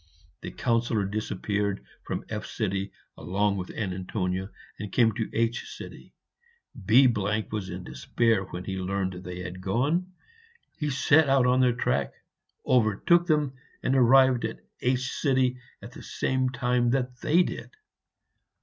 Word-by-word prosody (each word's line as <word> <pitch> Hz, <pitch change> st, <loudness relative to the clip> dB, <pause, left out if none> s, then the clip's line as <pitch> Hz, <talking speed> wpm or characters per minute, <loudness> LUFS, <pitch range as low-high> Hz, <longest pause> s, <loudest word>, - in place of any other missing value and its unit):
The -, -, -5 dB
Councillor 115 Hz, -3 st, 0 dB
disappeared 100 Hz, 0 st, -2 dB, 0.2 s
from -, -, -5 dB
F 105 Hz, 0 st, -5 dB, 0.7 s
along 100 Hz, +2 st, 0 dB
with 90 Hz, -1 st, -5 dB
Antonia, 95 Hz, -1 st, -3 dB, 0.3 s
and 105 Hz, -2 st, -6 dB
came 115 Hz, 0 st, +4 dB
to 110 Hz, +1 st, -3 dB
H. 115 Hz, +1 st, -2 dB, 1.1 s
B 125 Hz, +5 st, +7 dB
was 105 Hz, -3 st, -1 dB
in 90 Hz, 0 st, -6 dB
despair 100 Hz, -, 0 dB
when 90 Hz, 0 st, -7 dB
he 95 Hz, 0 st, -4 dB
learned 95 Hz, 0 st, -2 dB
that 90 Hz, 0 st, -9 dB
they 90 Hz, 0 st, -6 dB
had 90 Hz, 0 st, -7 dB
gone. 145 Hz, -, 0 dB, 0.7 s
He 150 Hz, -2 st, -1 dB
set 140 Hz, +2 st, +4 dB
out 135 Hz, -2 st, +4 dB
on 125 Hz, +1 st, +3 dB
their 125 Hz, -1 st, +4 dB
track, 70 Hz, -, 0 dB, 0.5 s
overtook 130 Hz, -, +3 dB
them, 150 Hz, -4 st, +1 dB, 0.3 s
and 130 Hz, -, +1 dB
arrived 130 Hz, 0 st, +5 dB
at 110 Hz, 0 st, -4 dB, 0.2 s
H 130 Hz, +1 st, -1 dB, 0.6 s
at -, -, -9 dB
the -, -, -11 dB
same 130 Hz, -1 st, -1 dB
time 125 Hz, -1 st, +1 dB
that 125 Hz, -1 st, -1 dB
they 170 Hz, +4 st, +4 dB
did. -, -, -6 dB
115 Hz, 135 wpm, -27 LUFS, 95-130 Hz, 1.1 s, B